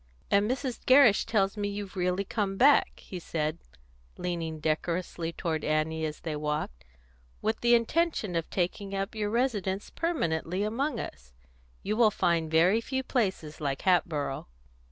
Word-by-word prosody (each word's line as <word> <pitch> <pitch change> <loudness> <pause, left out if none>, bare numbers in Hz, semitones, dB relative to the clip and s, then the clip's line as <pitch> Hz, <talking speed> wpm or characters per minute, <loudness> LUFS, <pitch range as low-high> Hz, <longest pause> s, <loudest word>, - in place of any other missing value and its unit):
"And 200 +2 +3
Mrs. 255 -1 -3
Gerrish 255 -6 +6
tells 195 -2 +1
me 205 -1 -2
that - - -5
you've 205 -2 -6
really 180 +1 0
come 200 -1 -2
back," 280 +5 +4
he 185 - -6
said, 155 -1 -2 0.6
leaning 165 -3 -3
decorously 165 +2 -2
toward 165 -3 -3
Annie 155 +1 0
as 150 - -8
they 160 -2 -3
walked, 150 - -3 0.6
"with 220 0 0
the 240 0 +5
intention 235 - 0
of 165 -1 -1
taking 195 +2 -2
up 195 +3 -2
your 210 -2 -2
residence 210 -5 -1
permanently 185 - -1
among 235 +4 -1
us. 60 -3 -8 0.5
You 210 - -1
will 225 -1 +5
find 170 -5 +1
very 175 +8 +4
few 265 +2 -2
places 190 - -2
like 140 -2 -2
Hatboro'." 155 - +1
190 Hz, 155 wpm, -29 LUFS, 160-220 Hz, 0.6 s, Gerrish